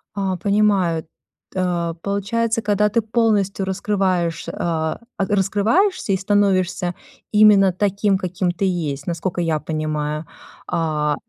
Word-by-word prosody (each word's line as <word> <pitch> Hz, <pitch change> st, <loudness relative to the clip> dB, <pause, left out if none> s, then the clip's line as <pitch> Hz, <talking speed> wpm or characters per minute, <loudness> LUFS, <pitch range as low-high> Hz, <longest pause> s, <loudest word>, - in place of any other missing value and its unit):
А, 190 Hz, -2 st, -1 dB
понимаю. 200 Hz, -5 st, +1 dB, 0.5 s
Т 175 Hz, -3 st, -1 dB
получается, 225 Hz, +4 st, -1 dB
когда 210 Hz, 0 st, +2 dB
ты 230 Hz, -, +1 dB
полностью 210 Hz, -4 st, +1 dB
раскрываешь, 190 Hz, -4 st, -1 dB
а, 160 Hz, 0 st, -2 dB, 0.2 s
а, 195 Hz, -, +1 dB
раскрываешься 205 Hz, -, +1 dB
и 190 Hz, -, +3 dB
становишься 190 Hz, -3 st, +1 dB, 0.4 s
именно 210 Hz, -3 st, +6 dB
таким, 200 Hz, +1 st, +1 dB
каким 185 Hz, 0 st, -1 dB
ты 180 Hz, +3 st, -2 dB
есть, 150 Hz, -6 st, -2 dB
насколько 175 Hz, +1 st, -2 dB
я 160 Hz, -3 st, 0 dB
понимаю. 155 Hz, 0 st, -3 dB, 0.4 s
А, 150 Hz, -2 st, 0 dB
190 Hz, 115 wpm, -21 LUFS, 170-205 Hz, 0.5 s, именно